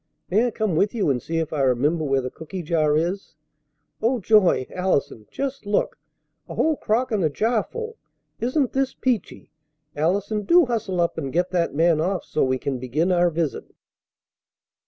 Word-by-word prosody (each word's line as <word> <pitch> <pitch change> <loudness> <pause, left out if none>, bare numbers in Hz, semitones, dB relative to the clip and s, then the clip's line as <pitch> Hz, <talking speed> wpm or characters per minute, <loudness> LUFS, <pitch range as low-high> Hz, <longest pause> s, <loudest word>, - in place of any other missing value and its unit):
May 220 +6 +3
I - - +1
come 215 -5 -1
with 200 +7 +1
you 195 -10 +2
and 125 -2 -1
see 165 - -3
if 160 -1 -2
I 150 - 0
remember 140 +5 +2
where 135 -2 +1
the 130 0 -5
cooky 170 +3 -7
jar 155 -2 +2
is? 175 +1 -2 0.7
Oh, 245 +3 +1
joy, 205 -9 +4
Allison! 145 - -1
Just 275 -5 -4
look! 205 - 0 0.5
A - - -6
whole 320 -1 +2
crock 245 +1 0
and 210 -4 +1
a 155 - +3
platter 220 - 0
full! 460 -1 -6 0.4
Isn't 255 +2 0
this 270 0 0
peachy? 250 -5 -2 0.4
Allison, 200 +7 0
do 340 - +5
hustle 220 -7 -2
up 170 -1 0
and 135 -4 -4
get 175 +4 0
that 170 -5 0
man 165 0 +3
off 185 +1 -1
so - - 0
we 130 0 +1
can 130 0 -3
begin 150 +9 0
our 175 -1 +3
visit!" 165 -3 -2
180 Hz, 180 wpm, -23 LUFS, 155-220 Hz, 0.7 s, do